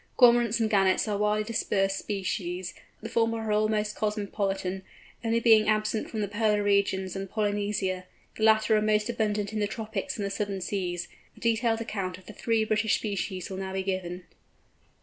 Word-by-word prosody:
Cormorants 235 -2 +5
and 225 - +2
Gannets 195 -1 +3
are 210 - 0
widely 210 +1 +1
dispersed 195 -3 0
species; 185 -3 -3 0.3
the 225 - -5
former 230 0 +1
are 220 -1 -2
almost 210 0 +1
cosmopolitan, 200 -3 -2 0.4
only 230 0 +2
being 220 -2 +5
absent 215 0 0
from 220 - -3
the 205 - 0
polar 210 0 +1
regions 200 -2 +1
and 195 0 -4
Polynesia; 205 -3 -1 0.3
the - - -9
latter 220 0 +5
are 215 - +3
most 215 +1 +2
abundant 215 -2 -1
in 215 - -1
the 205 - +1
tropics 220 +6 -4
and 205 - -2
the 200 - -3
southern 200 -1 -2
seas. 180 -2 -3 0.3
A - - -13
detailed 230 0 +1
account 195 -5 -3
of 185 - -18
the 215 - -10
three 225 0 +1
British 215 0 +2
species 195 -3 -3
will 190 - -4
now 190 0 -4
be 190 0 -1
given. 185 -2 -3
210 Hz, 180 wpm, -28 LUFS, 195-220 Hz, 0.4 s, Cormorants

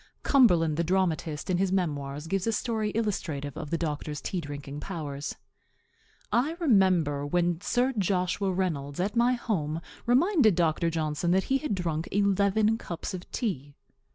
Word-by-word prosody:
Cumberland, 175 - +4
the 170 - +2
dramatist, 165 -4 0
in 180 -1 +1
his 190 -1 +1
memoirs 145 -6 -2
gives 195 +4 -1
a - - +3
story 220 -1 -1
illustrative 160 - -2
of 150 - -6
the 165 - 0
doctor's 150 -2 -3
tea 180 - -3
drinking 145 -1 -7
powers: 150 -5 -5 1.0
"I 280 +8 +1
remember 185 - +3
when 175 +3 0
Sir 250 +5 +1
Joshua 190 -1 0
Reynolds, 155 -6 -2
at 200 +5 -1
my 240 +2 +4
home, 165 -11 -2 0.3
reminded 255 - +4
Dr. 165 -1 +2
Johnson 160 +1 -1
that 190 +2 +3
he 270 - +3
had 300 -9 -2
drunk 165 -3 -2
eleven 200 +2 +2
cups 170 -3 -5
of 180 -1 -8
tea. 145 - -3
180 Hz, 155 wpm, -28 LUFS, 155-210 Hz, 1.0 s, Cumberland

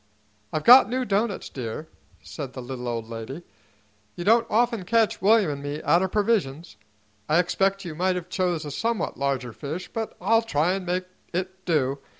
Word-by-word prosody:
"I've 155 - -2
got 245 -2 +9
new 255 +1 -1
doughnuts, 205 -1 -1
dear," 125 +4 -6 0.4
said 140 -5 -7
the 130 - -6
little 125 -1 -6
old 115 -2 -3
lady. 115 +8 -7 0.7
"You 175 - -5
don't 230 +4 +4
often 230 -2 +1
catch 225 +2 +1
William 205 -4 +4
'n' 140 -1 -5
me 145 +1 -4
out 170 - +4
o' 190 - +1
provisions. 185 - -1 0.5
I 155 - +4
expect 195 +2 +1
you 170 - -5
might 180 +3 0
have 180 -1 -5
chose 180 -4 -1
a 145 - -5
somewhat 225 +3 -2
larger 135 -4 -1
fish, 155 +8 -6
but 225 -1 -4
I'll 225 +5 +3
try 175 -5 +1
an' 190 -1 -4
make 180 +1 -1 0.3
it 185 +1 -4
do. 140 -5 +1
180 Hz, 180 wpm, -25 LUFS, 145-205 Hz, 0.7 s, got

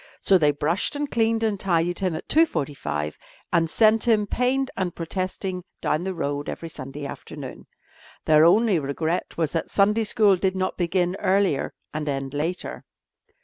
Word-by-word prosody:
So 190 -2 +4
they 150 -2 +4
brushed 155 - 0
and 290 0 -3
cleaned 225 0 +1
and 210 -3 0
tidied 175 -2 +1
him 185 -4 0
at 155 - -7
2.45 135 - 0 0.4
and 165 -1 +3
sent 225 +5 +4
him, 215 -3 +4
pained 255 +5 0
and 185 -3 -2
protesting, 185 +1 -3 0.2
down 155 +4 -1
the 190 -1 -3
road 145 -2 -3
every 165 - -6
Sunday 145 -1 -7
afternoon. - - -8 0.6
Their 155 0 +6
only 195 +2 +4
regret 160 +5 -2
was 160 -3 0
that 165 - -2
Sunday 210 +3 +3
school 205 -2 +4
did 190 +1 0
not 185 0 -1
begin 180 0 0
earlier 190 -7 +1 0.2
and 155 -1 -3
end 135 -1 -3
later. 160 +5 -3
180 Hz, 160 wpm, -24 LUFS, 155-205 Hz, 0.6 s, Their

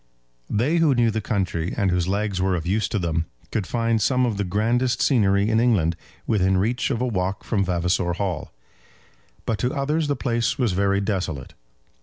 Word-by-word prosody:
They 130 +11 +1
who 160 -5 +3
knew 120 -2 +3
the 110 0 -2
country, 95 -6 -2
and 95 -2 +2
whose 90 -1 0
legs 100 -1 -1
were 95 -1 +1
of 85 - -3
use 100 +2 +1
to - - -1
them, 80 -3 -1 0.2
could 100 -4 -2
find 115 -2 0
some 125 +4 +2
of 115 -4 -1
the 100 - 0
grandest 115 +6 0
scenery 100 -6 +3
in 110 0 +2
England 100 -9 +2 0.3
within 95 -4 +2
reach 115 +6 0
of 125 -3 -1
a - - +1
walk 95 -3 -2
from 100 -4 0
Vavasor 90 0 0
Hall; 90 -3 -3 0.9
but 110 -3 -1
to 125 +5 -1
others 150 +3 0
the 145 - 0
place 120 -1 -1
was 125 -6 +1
very 100 +1 +1
desolate. 90 -9 -3
100 Hz, 190 wpm, -23 LUFS, 95-120 Hz, 0.9 s, who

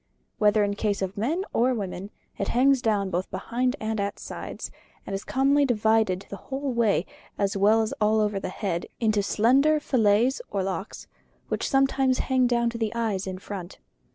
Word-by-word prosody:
Whether 210 0 +4
in 205 0 0
case 205 -1 -1
of 190 0 -4
men 310 - -1
or 250 +2 +2
women, 195 -2 -5 0.3
it 200 - -1
hangs 265 +1 +3
down 205 -5 0
both 180 +2 -2
behind 250 +2 -1
and 220 0 -2
at 200 0 -2
the - - -15
sides, - - -6 0.3
and - - -6
is 195 - -3
commonly 275 +2 +2
divided 220 -6 +2
the 200 - -5
whole 270 +2 -4
way, 220 -6 +2 0.3
as 200 0 0
well 215 +3 +4
as 220 - -3
all 215 +1 +3
over 210 -2 0
the - - -4
head, 185 -3 -3
into 215 -3 +2
slender 270 +10 +3
fillets 235 -1 +2
or 195 -2 -1
locks, 195 +2 -5 0.4
which - - -1
sometimes 270 -1 +2
hang 260 -2 +2
down 235 -1 +1
to 230 - -6
the 220 -2 -1
eyes 210 -5 -1
in 185 -1 -4
front. 190 -1 -8
220 Hz, 185 wpm, -26 LUFS, 200-250 Hz, 0.4 s, Whether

